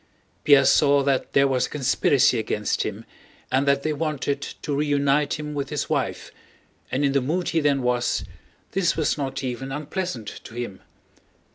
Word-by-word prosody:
Pierre 140 -2 +6
saw 140 0 +4
that 135 -1 0
there 140 0 +5
was 130 -2 +1
a - - -16
conspiracy 135 -2 +2
against 105 -1 -1
him - - -4 0.5
and 135 +2 +2
that 140 0 +3
they 155 - 0
wanted 145 -2 -2
to 145 0 -5
reunite 145 0 +1
him 150 0 -5
with 140 -1 -3
his - - -3
wife, - - -2 0.6
and 140 +3 +1
in 140 - +2
the 140 0 +2
mood 165 +7 -1
he 165 - +1
then 140 -3 +1
was, 125 -1 0 0.5
this 180 -4 +1
was 155 - +1
not 135 -1 -4
even 130 +1 -4
unpleasant 150 - -4 0.2
to 115 - -11
him. 120 -6 -5
140 Hz, 170 wpm, -24 LUFS, 130-150 Hz, 0.6 s, Pierre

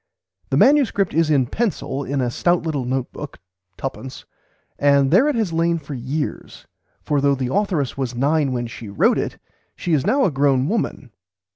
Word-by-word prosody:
The - - +1
manuscript 265 -8 +3
is 165 0 +2
in 140 -4 +3
pencil 160 - -2
in 140 0 -2
a 120 -1 -1
stout 175 +6 +1
little 150 -6 -2
note 130 0 -2
book - - -8 0.4
(twopence), 130 -1 -6 0.5
and 140 -1 +3
there 230 - +5
it 300 - +1
has 215 -7 -1
lain 170 +1 +1
for 145 -2 -8
years, 135 +4 -5 0.4
for 145 -2 0
though 140 0 +3
the 130 -1 -3
authoress 180 -12 0
was 125 -2 -2
nine 145 +2 +1
when 120 -1 -2
she 115 -2 -8
wrote 100 - +2
it - - -3 0.4
she 175 - -2
is 145 -4 +2
now 275 0 +2
a - - +1
grown 135 -1 +2
woman. 205 - -2
145 Hz, 180 wpm, -21 LUFS, 130-170 Hz, 0.5 s, there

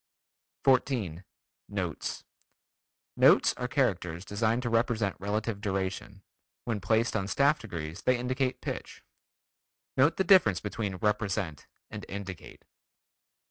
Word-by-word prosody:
14. 120 - +2 0.5
Notes: - - -3 0.9
Notes - - +6
are 125 - -4
characters 95 - 0
designed 110 +4 0
to 120 - -1
represent 115 -3 +1
relative 105 +1 -2
duration. 95 0 -3 0.4
When 115 -4 -2
placed 110 +4 +1
on 100 -3 -1
staff 140 +8 +3
degrees 85 -3 -6
they 125 -1 +2
indicate 130 +1 -1
pitch. - - -6 0.9
(Note 145 +5 +4
the 190 - +3
difference 170 - +5
between 105 -2 -3
"represent" 95 -6 -1 0.2
and - - -6
"indicate.") 95 -3 -8
105 Hz, 110 wpm, -29 LUFS, 95-125 Hz, 0.9 s, Notes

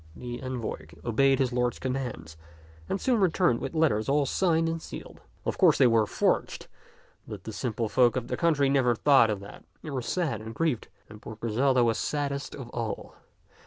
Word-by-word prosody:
The 120 -1 -7
envoy 125 -11 -5 0.2
obeyed 135 +4 +3
his 130 -2 0
lord's 125 0 0
commands 125 -12 -4 0.5
and 195 - -1
soon 245 0 +1
returned 175 - +2
with - - -5
letters 140 -8 +2
all 145 +1 +3
signed 165 +2 +1
and 165 0 -2
sealed. - - -10 0.2
Of - - -2
course - - +5
they - - +5
were 115 -3 +4
forged, - - 0 0.6
but - - -8
the - - -7
simple 115 -2 -2
folk 120 +3 +3
of 125 -2 -2
the - - -2
country 155 -5 +2
never 130 -3 +3
thought 135 -2 +5
of 105 -2 -2
that. 100 - -11 0.2
They 155 - -6
were 130 -2 -2
sad 135 - -2
and 110 +1 -8
grieved, 160 -8 -1 0.2
and 105 0 -13
poor 110 - -8
Griselda 120 +4 +2
was 115 -1 +1
saddest 145 -1 -2
of 130 -4 -8
all. 115 -3 -4
130 Hz, 190 wpm, -27 LUFS, 115-145 Hz, 0.6 s, course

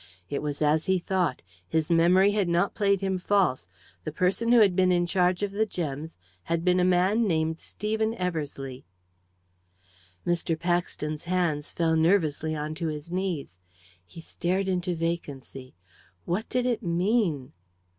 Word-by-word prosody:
It 140 - -1
was 150 0 -2
as 155 +1 +2
he 190 0 +3
thought; 180 -5 -1 0.2
his 160 +1 0
memory 180 +4 +5
had 205 -3 +1
not 175 +3 +1
played 200 -2 +1
him 190 -1 -1
false 180 - +1 0.4
the 155 - -4
person 185 +8 +1
who 240 - +7
had 200 -5 +5
been 185 0 +3
in 175 -1 +2
charge 180 +1 +1
of 205 - -1
the 215 +2 0
gems 160 - -5 0.3
had 170 +1 -1
been 180 0 +3
a - - +3
man 185 +5 +3
named 160 -2 0
Stephen 220 +1 -2
Eversleigh. 145 - -4 1.4
Mr. 170 -2 0
Paxton's 170 -3 -2
hands 170 -5 -1
fell 165 -1 +1
nervelessly 160 -2 +2
on 150 +1 -3
to 165 +1 -3
his 155 +1 -5
knees. 175 - -3 0.4
He 130 - -12
stared 185 +4 -2
into 180 -1 -1
vacancy. 145 -6 -5 0.5
What 195 +7 -2
did 250 -1 0
it 245 -3 0
mean? 175 - 0
175 Hz, 155 wpm, -27 LUFS, 155-190 Hz, 1.4 s, who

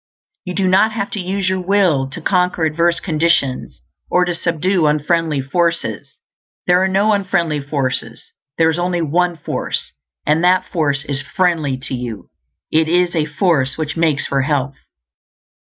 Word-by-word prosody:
You 180 -1 -5
do 190 -1 +1
not 195 +4 +3
have 205 -2 -3
to 210 - -4
use 190 +1 -2
your 185 0 0
will 180 -8 +2
to 135 - -8
conquer 180 -3 +1
adverse 170 +2 +1
conditions, 155 -6 0 0.3
or 180 0 +3
to 175 - -1
subdue 170 0 0
unfriendly 155 0 +1
forces; 155 - -2 0.5
there 180 +1 +4
are - - +2
no 200 +3 +2
unfriendly 175 -6 0
forces; 140 -2 -3 0.3
there 160 -1 +4
is 160 - -3
only 175 -1 0
One 175 +3 0
Force, - - -4 0.3
and 155 +3 +2
that 185 +1 +3
force 145 -6 -1
is 140 -2 -2
friendly 165 -7 0
to 135 - -6
you; 120 -4 -6 0.4
it 160 0 +3
is 175 +1 +2
a 155 -2 +1
force 150 -4 +1
which 155 -1 -3
makes 160 -4 +1
for 135 -1 0
health. 140 -1 -1
170 Hz, 160 wpm, -18 LUFS, 145-180 Hz, 0.5 s, there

